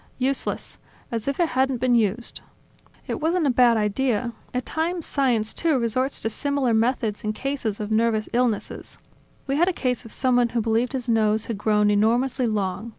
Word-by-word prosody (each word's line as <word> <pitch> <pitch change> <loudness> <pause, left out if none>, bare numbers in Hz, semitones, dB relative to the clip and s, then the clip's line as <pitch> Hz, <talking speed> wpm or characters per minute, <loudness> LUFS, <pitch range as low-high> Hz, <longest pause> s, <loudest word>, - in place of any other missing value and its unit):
"Useless. 265 +1 -2 0.3
As 230 0 -3
if 280 +3 -2
it 340 -2 +2
hadn't 265 0 +1
been 250 +1 +1
used." 230 0 0 0.6
"It - - -4
wasn't 330 +1 +1
a 275 - +3
bad 240 -2 +4
idea. 230 +2 0 0.2
At 250 0 -3
times 335 +1 -2
science, 240 -6 +1
too, 320 -4 +1
resorts 255 +3 0
to 225 - -1
similar 280 0 0
methods 225 -2 0
in 215 0 -1
cases 260 -4 -3
of 210 0 -4
nervous 220 -1 +1
illness. 235 -3 -1 0.5
We 275 +1 -1
had 345 +3 +4
a 375 - +1
case 250 -6 -2
of 225 - -11
someone 245 -2 +2
who - - +4
believed 230 +4 0
his 255 -2 -3
nose 220 -2 +2
had 225 -4 -4
grown 210 -1 +3
enormously 240 +5 +2
long. 205 0 -2
240 Hz, 180 wpm, -24 LUFS, 220-265 Hz, 0.6 s, bad